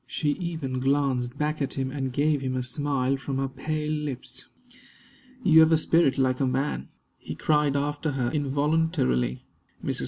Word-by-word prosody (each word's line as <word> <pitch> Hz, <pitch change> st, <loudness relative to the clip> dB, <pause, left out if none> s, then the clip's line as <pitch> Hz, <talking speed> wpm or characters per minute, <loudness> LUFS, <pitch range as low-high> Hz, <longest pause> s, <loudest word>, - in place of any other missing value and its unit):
She 150 Hz, -2 st, 0 dB
even 160 Hz, -6 st, -3 dB
glanced 135 Hz, -2 st, 0 dB
back 150 Hz, +1 st, -1 dB
at 135 Hz, -, -1 dB
him, 130 Hz, -1 st, -2 dB
and 135 Hz, -2 st, -3 dB
gave 145 Hz, +2 st, +1 dB
him 130 Hz, -1 st, -2 dB
a 130 Hz, -, -1 dB
smile 135 Hz, 0 st, -1 dB
from 135 Hz, 0 st, -4 dB
her 135 Hz, 0 st, 0 dB
pale 150 Hz, +3 st, -3 dB
lips. 140 Hz, -4 st, -5 dB, 1.0 s
"You 160 Hz, -5 st, +7 dB
have 160 Hz, 0 st, +6 dB
a 160 Hz, -, +6 dB
spirit 155 Hz, -3 st, +3 dB
like 130 Hz, -1 st, +1 dB
a 135 Hz, -, +2 dB
man!" 135 Hz, +3 st, -1 dB, 0.3 s
he -, -, -7 dB
cried 150 Hz, -2 st, +2 dB
after 145 Hz, +1 st, -1 dB
her, 125 Hz, -3 st, -1 dB
involuntarily. 140 Hz, -, 0 dB, 0.4 s
Mrs. -, -, -1 dB
140 Hz, 165 wpm, -26 LUFS, 130-150 Hz, 1.0 s, You